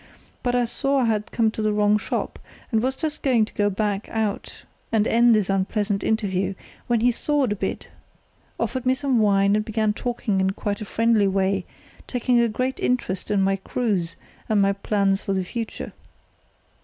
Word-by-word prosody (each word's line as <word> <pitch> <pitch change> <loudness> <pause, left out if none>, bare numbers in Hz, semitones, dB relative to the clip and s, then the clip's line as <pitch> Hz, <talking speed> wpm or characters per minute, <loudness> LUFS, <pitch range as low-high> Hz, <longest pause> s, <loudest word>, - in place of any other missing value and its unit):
But 245 0 0
I 245 -1 +2
saw 275 +3 0
I - - +2
had 215 -2 0
come 225 -2 +2
to 220 - -4
the 215 0 +1
wrong 210 0 +3
shop, - - -3 0.3
and 220 -2 +2
was 260 +2 0
just 310 +1 -3
going 245 -5 +3
to 205 -1 0
back 205 0 -2
out 220 -2 -3 0.3
and 220 -1 +2
end 235 0 +5
this 210 -3 +1
unpleasant 195 +1 0
interview, 195 -3 0 0.3
when 235 -2 +2
he 245 +1 +4
thawed 275 0 0
a - - 0
bit, - - -4 0.7
offered 260 -2 -2
me 260 - +4
some 260 -3 +1
wine, 200 -1 +3
and 215 - +1
began 215 -1 0
talking 220 -4 -1
in 190 0 +1
quite 205 +1 -3
a - - -4
friendly 225 -1 +2
way, 195 0 0 0.4
taking 245 -1 +1
a 235 -1 +3
great 255 +4 -2
interest 195 -7 -1
in 200 -2 +2
my 195 0 +2
cruise 190 -5 -2 0.3
and 215 -2 +3
my 200 0 +3
plans 195 -1 0
for 195 - -2
the 190 -1 0
future. 230 +3 -5
215 Hz, 185 wpm, -23 LUFS, 195-240 Hz, 0.7 s, end